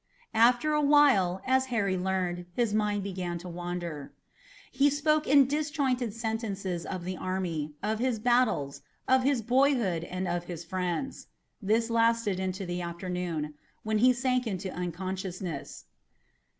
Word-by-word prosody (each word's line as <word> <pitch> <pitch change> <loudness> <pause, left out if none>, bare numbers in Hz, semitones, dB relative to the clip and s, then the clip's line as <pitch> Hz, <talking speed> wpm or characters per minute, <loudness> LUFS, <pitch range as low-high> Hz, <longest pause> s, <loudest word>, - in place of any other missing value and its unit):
After 245 +7 +4
a 300 - +2
while, 275 -12 +4
as 260 0 +2
Harry 205 -6 0
learned, 180 -1 -2
his 235 -4 +1
mind 210 -1 +1
began 180 -3 -3
to 175 +2 -9
wander. 175 -4 -5 0.6
He 275 +2 +4
spoke 305 +2 +1
in 280 0 +6
disjointed 280 -4 0
sentences 205 -6 -3
of 185 -2 -5
the 185 +1 -3
army, 170 -5 -3
of 215 +1 -1
his 250 -1 +1
battles, 220 - +1 0.3
of 260 0 +5
his 260 -3 +1
boyhood 245 - +2
and 185 +1 -4
of 175 0 -2
his 170 -1 -7
friends. 185 +9 -3 0.3
This 225 +3 +1
lasted 230 -4 +2
into 190 +1 -3
the 175 0 -3
afternoon, 170 -3 -3 0.3
when 215 0 0
he 255 +3 +6
sank 250 0 0
into 190 -2 -4
unconsciousness. 180 -2 -5
200 Hz, 140 wpm, -29 LUFS, 180-250 Hz, 0.6 s, in